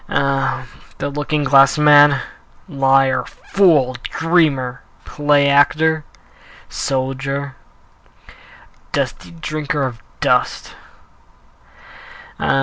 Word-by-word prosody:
Ah, 135 -1 -1 0.3
this. 140 0 -5
looking 150 0 -2
glass 135 +1 +4
man! 145 -1 +5 0.5
Liar, 135 -3 +2
fool, 160 -10 +1
dreamer, 155 -7 0 0.2
play 145 -1 +1
actor, 155 +2 +2 0.6
Soldier, 135 +1 -3 1.4
dusty 90 - -3
drinker 145 - -4
of 120 -4 -5 0.2
dust - - 0 1.7
Ah! 135 - +1
140 Hz, 75 wpm, -18 LUFS, 135-150 Hz, 1.7 s, man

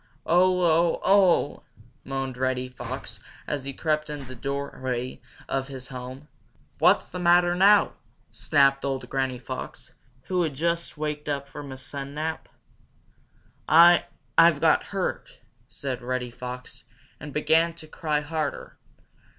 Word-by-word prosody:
"Oh! 180 +1 +3 0.3
Oh! - - -10
Oh!" 190 -6 +3 0.4
moaned 135 -1 -4
Reddy 130 0 -1
Fox, 125 - -7 0.3
as 145 -3 -3
he 140 - -3
crept 155 +2 -1
in 150 -1 -5
at 135 - -10
the 130 - -8
doorway 130 -1 -4 0.3
of 135 0 -2
his 130 -2 -8
home. 130 +2 -8 0.5
"What's - - +4
the 180 - -7
matter 175 0 +4
now?" 200 +3 +5 0.4
snapped 140 -2 +2
old 135 -1 -2
Granny 130 -2 -1
Fox, 120 - -8 0.3
who 180 -1 0
had 155 -5 -1
just 170 +2 -2
waked 150 0 -3
up 140 -1 -2
from 145 -1 -9
a 130 - -7
sun 140 +1 -7
nap. 160 +1 -4 1.2
"I 170 +3 +7 0.3
I've 165 -3 +6
got 160 0 +3
hurt," 195 -2 -4 0.3
said 130 -3 -5
Reddy 125 0 -3
Fox, 125 +1 -8 0.4
and 150 - -8
began 160 +3 +3
to 165 -1 -11
cry 155 -2 -1
harder. 155 +1 -4
145 Hz, 140 wpm, -26 LUFS, 130-165 Hz, 1.2 s, I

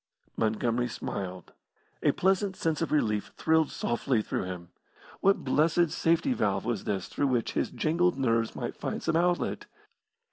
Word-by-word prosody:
Montgomery 115 +2 0
smiled. 95 -6 -5 0.5
A - - +4
pleasant 190 +1 +1
sense 160 -3 -1
of 165 - -1
relief 105 -9 +1
thrilled 160 -1 +3
softly 120 -1 0
through - - -2
him. 90 -2 -7 0.5
What 195 +1 +3
blessed 160 +4 +3
safety 170 +11 +2
valve 100 - 0
was 115 -4 -2
this 95 -3 -2
through 145 - 0
which 125 -3 0
his - - 0
jangled 170 +2 +1
nerves 115 -4 +1
might - - -4
find - - -4
some 165 - 0
outlet. 175 +1 +1
135 Hz, 150 wpm, -29 LUFS, 110-165 Hz, 0.5 s, A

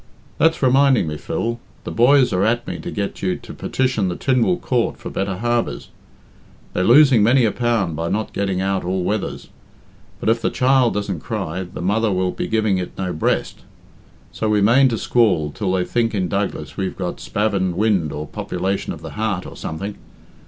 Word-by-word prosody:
That's 160 -2 +3
reminding 135 -2 +4
me, 75 -1 -3
Phil 115 +9 -3 0.2
the - - -5
boys 125 +1 +4
are 90 +1 +2
at 120 +3 +1
me - - -5
to - - -6
get 100 -2 -4
you 95 -2 0
to - - -10
petition 130 -7 -1
the 90 - -2
Tynwald 130 - +1
Court 120 -3 0
for - - -8
better 95 -1 -2
harbours. 120 +2 -1 0.8
They're 90 - 0
losing 130 +1 +6
many 120 +4 +4
a 110 - +2
pound 115 -9 0
by 85 +2 -2
not 110 +1 -2
getting 95 -2 -1
out 95 0 0
all 90 +1 -1
weathers. 105 +2 -3 0.7
But - - -5
if 115 +1 +2
the - - +1
child 130 -2 +3
doesn't 100 -4 -2
cry, 80 +4 -4
the - - -6
mother 105 +3 +1
will 90 -1 0
be - - -4
giving 110 -4 +1
it 90 - -6
no 95 -2 -2
breast. 80 - -1 0.7
So 110 - -2
we 105 -1 +3
mane 120 +6 +5
to 115 - -1
squall 95 -14 +2
till 95 +3 -2
they 90 -1 +1
think 115 -2 0
in 95 -2 0
Douglas 100 -5 -3
we've 95 -2 -3
got - - -4
spavined 100 -4 -1
wind 95 -7 +1
or 75 +1 -5
population 95 +5 -3
of - - -11
the - - -7
heart, 105 -4 -2
or - - -9
something. 100 +6 -6
105 Hz, 195 wpm, -20 LUFS, 95-120 Hz, 0.8 s, losing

